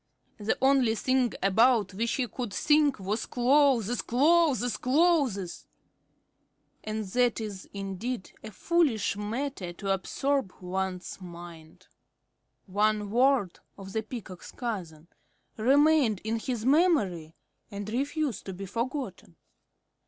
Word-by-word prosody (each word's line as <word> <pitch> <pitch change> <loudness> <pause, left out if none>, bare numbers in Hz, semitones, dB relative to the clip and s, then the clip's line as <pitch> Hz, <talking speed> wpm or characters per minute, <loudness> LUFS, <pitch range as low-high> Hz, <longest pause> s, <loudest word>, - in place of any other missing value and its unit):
The 210 +1 -1
only 265 -4 +4
thing 255 +1 +1
about 215 0 +3
which 230 +4 -1
he 255 -2 -1
could 240 -1 -5
think 295 -1 +3
was 200 +4 -3
clothes 245 -3 +3
clothes 280 -2 +3
clothes; 265 - +1 1.2
and 215 0 -3
that 245 +5 +1
is 205 -4 -7
indeed 200 +3 -5
a - - -7
foolish 250 - +1
matter 210 -1 -4
to 195 +2 -1
absorb 270 +3 -1
one's 185 0 -4
mind. 170 -2 -11 0.8
One 210 +1 0
word 245 -5 +2 0.2
of 195 -1 -10
the 220 - 0
Peacock's 215 -5 -9
cousin 175 -10 -5 0.5
remained 275 -2 +3
in 225 +1 -1
his 235 -1 -3
memory 235 - +2 0.3
and 200 -1 -6
refused 280 +3 -2
to 190 - -4
be 195 +2 -7
forgotten. 230 - -4
220 Hz, 115 wpm, -28 LUFS, 195-265 Hz, 1.2 s, only